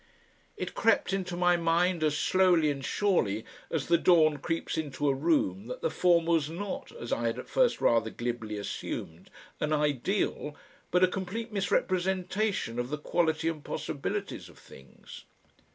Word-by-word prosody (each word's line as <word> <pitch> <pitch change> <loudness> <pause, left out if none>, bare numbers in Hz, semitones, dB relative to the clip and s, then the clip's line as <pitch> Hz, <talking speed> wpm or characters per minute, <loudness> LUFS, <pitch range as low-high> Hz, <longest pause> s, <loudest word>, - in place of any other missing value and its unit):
It - - -4
crept 225 -4 +2
into 180 -2 -2
my 175 0 +4
mind 170 +1 +2
as 150 -1 +1
slowly 180 -5 +3
and 140 -1 -5
surely 130 - +1 0.2
as 160 -4 -1
the 170 0 +3
dawn 155 -4 +5
creeps 165 +3 -2
into 145 -2 -2
a 140 - +4
room 135 - 0
that 125 - -6
the - - +1
former 170 0 +3
was 155 -3 +2
not, 205 +11 -5
as 475 - -4
I - - 0
had - - -2
at - - -7
first - - +2
rather 115 -1 +3
glibly 120 -2 -4
assumed, 85 -4 -6 0.3
an 150 - -1
"ideal," 150 - 0 0.3
but 180 +1 +3
a - - +7
complete 195 +5 -5
misrepresentation 185 - 0
of 120 +1 -2
the 150 - -2
quality 160 +1 0
and 160 -3 -2
possibilities - - -4
of - - -17
things. 65 0 -14
165 Hz, 160 wpm, -29 LUFS, 140-185 Hz, 0.3 s, a